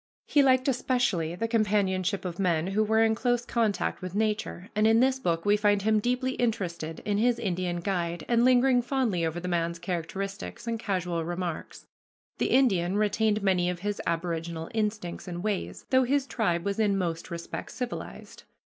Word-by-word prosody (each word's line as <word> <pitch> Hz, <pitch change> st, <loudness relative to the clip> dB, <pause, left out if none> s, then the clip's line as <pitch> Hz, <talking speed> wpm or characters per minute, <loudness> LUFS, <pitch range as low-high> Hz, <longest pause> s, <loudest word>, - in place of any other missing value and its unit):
He 290 Hz, -, +4 dB
liked 260 Hz, -1 st, +4 dB
especially 245 Hz, -11 st, 0 dB
the 230 Hz, +5 st, -2 dB
companionship 200 Hz, -4 st, +1 dB
of 175 Hz, 0 st, -5 dB
men 170 Hz, -4 st, +1 dB
who 195 Hz, +3 st, +1 dB
were 220 Hz, +1 st, +3 dB
in 220 Hz, 0 st, +3 dB
close 245 Hz, +1 st, 0 dB
contact 220 Hz, -6 st, 0 dB
with 185 Hz, 0 st, -6 dB
nature, 210 Hz, -3 st, -2 dB
and 215 Hz, +1 st, +4 dB
in 225 Hz, +1 st, +5 dB
this 260 Hz, +1 st, +3 dB
book 170 Hz, -6 st, -1 dB
we 205 Hz, 0 st, +5 dB
find 205 Hz, -1 st, +2 dB
him 215 Hz, 0 st, +3 dB
deeply 250 Hz, +3 st, 0 dB
interested 180 Hz, -10 st, -2 dB
in 205 Hz, -1 st, +1 dB
his 240 Hz, +1 st, +3 dB
Indian 180 Hz, -5 st, -2 dB
guide 170 Hz, -3 st, -2 dB
and 235 Hz, -1 st, +3 dB
lingering 255 Hz, 0 st, +5 dB
fondly 240 Hz, -9 st, 0 dB
over 165 Hz, +1 st, -1 dB
the 180 Hz, -, -5 dB
man's 170 Hz, -1 st, -1 dB
characteristics 190 Hz, +5 st, -5 dB
and 230 Hz, -1 st, -2 dB
casual 180 Hz, -5 st, -1 dB
remarks. 175 Hz, 0 st, -5 dB, 0.5 s
The -, -, +2 dB
Indian 195 Hz, -8 st, +3 dB
retained 210 Hz, 0 st, +1 dB
many 180 Hz, -2 st, +2 dB
of 180 Hz, -1 st, -4 dB
his 205 Hz, +1 st, -2 dB
aboriginal 165 Hz, -1 st, -3 dB
instincts 210 Hz, -5 st, -2 dB
and 175 Hz, 0 st, -5 dB
ways, 210 Hz, -3 st, -3 dB
though 260 Hz, 0 st, +5 dB
his 275 Hz, +2 st, +1 dB
tribe 175 Hz, -10 st, -1 dB
was 200 Hz, +1 st, -1 dB
in 205 Hz, -3 st, +2 dB
most 170 Hz, -3 st, -3 dB
respects 170 Hz, -1 st, -6 dB
civilized. 250 Hz, -1 st, -6 dB
200 Hz, 175 wpm, -28 LUFS, 175-230 Hz, 0.5 s, in